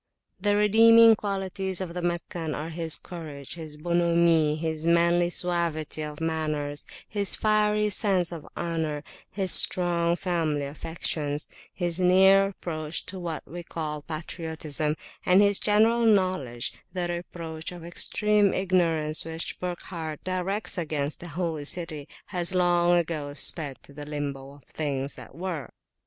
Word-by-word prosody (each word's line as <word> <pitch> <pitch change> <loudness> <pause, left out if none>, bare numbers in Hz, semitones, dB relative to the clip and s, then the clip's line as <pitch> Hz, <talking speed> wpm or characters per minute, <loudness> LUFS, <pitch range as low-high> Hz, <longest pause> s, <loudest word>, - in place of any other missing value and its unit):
The 205 +2 +2
redeeming 225 +2 +7
qualities 195 -2 -2
of 185 -3 -4
the 180 - -4
Meccan 170 -2 -3
are 160 +3 -5
his 165 -1 0
courage, 150 -6 -8
his 155 -3 -7
bonhommie, 170 -2 +2
his 160 0 -3
manly 170 +1 +4
suavity 170 -4 -1
of 150 -1 -5
manners, 155 -3 -2 0.2
his 200 -2 -1
fiery 210 0 +2
sense 190 -4 +1
of 165 -3 -8
honour, 160 -3 -2 0.3
his 190 -2 -2
strong 170 -1 +5
family 165 -6 -1
affections, 150 0 -3 0.2
his 175 -1 -3
near 190 +2 +6
approach 160 -5 -4
to 190 - -7
what 170 -3 -5
we 175 +2 -7
call 155 -3 -4
patriotism, 155 -1 -3 0.3
and 180 +1 +5
his 200 -1 +4
general 225 +3 +4
knowledge: 185 - +1 0.2
the 180 -2 -1
reproach 170 -2 -6
of 175 -2 -9
extreme 205 +3 +2
ignorance 165 -5 +1
which 165 0 -4
Burckhardt 170 -3 -5
directs 185 +2 -2
against 150 -3 -1
the 175 - -9
Holy 165 -2 -3
City 155 -3 -1 0.2
has 180 0 +1
long 175 -1 +4
ago 155 -4 -2
sped 145 -3 0
to 140 - -13
the 145 0 -8
Limbo 140 -2 -5
of 145 - -19
things 140 -2 -3
that - - -12
were. 170 -5 -4
170 Hz, 140 wpm, -26 LUFS, 155-185 Hz, 0.3 s, redeeming